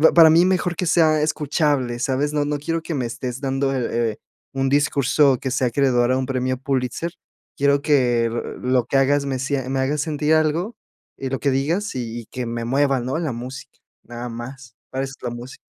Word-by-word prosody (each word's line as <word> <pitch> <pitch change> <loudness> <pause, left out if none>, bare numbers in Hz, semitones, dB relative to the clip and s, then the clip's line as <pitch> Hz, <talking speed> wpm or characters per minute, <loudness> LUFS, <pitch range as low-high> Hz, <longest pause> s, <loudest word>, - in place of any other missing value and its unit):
Para 165 -2 +9
mí, 165 +3 +6
mejor 180 -2 +1
que 180 - -1
sea 160 -3 +4
escuchable, 145 -5 0
¿sabes? 135 +3 0
No 145 -1 +1
no 145 0 -1
quiero 165 +3 -2
que 165 - -5
me 130 -5 -1
estés 125 +2 -5
dando 135 0 0
eh, 120 -3 0
el 105 - -11 0.3
un 135 0 -1
discurso 140 -1 +3
que 130 - -3
sea 130 0 +1
acreedor 125 -1 +2
a 130 - +2
un 130 - -1
premio 130 -1 -1
Pulitzer. 130 +5 -2 0.4
Quiero 140 0 +2
que 125 -6 +3
lo 125 +1 -1
que 135 - +1
hagas 140 +1 +3
me 135 -1 -1
sient 135 0 -2
me 135 0 -1
hagas 140 +3 0
sentir 150 0 0
algo 160 +7 +1 0.4
y 135 - -4
lo 135 - -2
que 140 - +1
digas 160 +10 0
y 120 -2 -4
y - - -15
que 125 -1 -5
me 115 0 -3
mueva, 135 +2 +2
¿no? 130 +5 -2
La 160 -5 -2
música, 125 +3 -8 0.3
nada 120 0 -7
más, 120 +1 -9
para 135 +1 -2
eso 135 0 -5
es - - -26
la 125 - -1
música. 120 +2 -9
135 Hz, 210 wpm, -22 LUFS, 125-150 Hz, 0.4 s, Para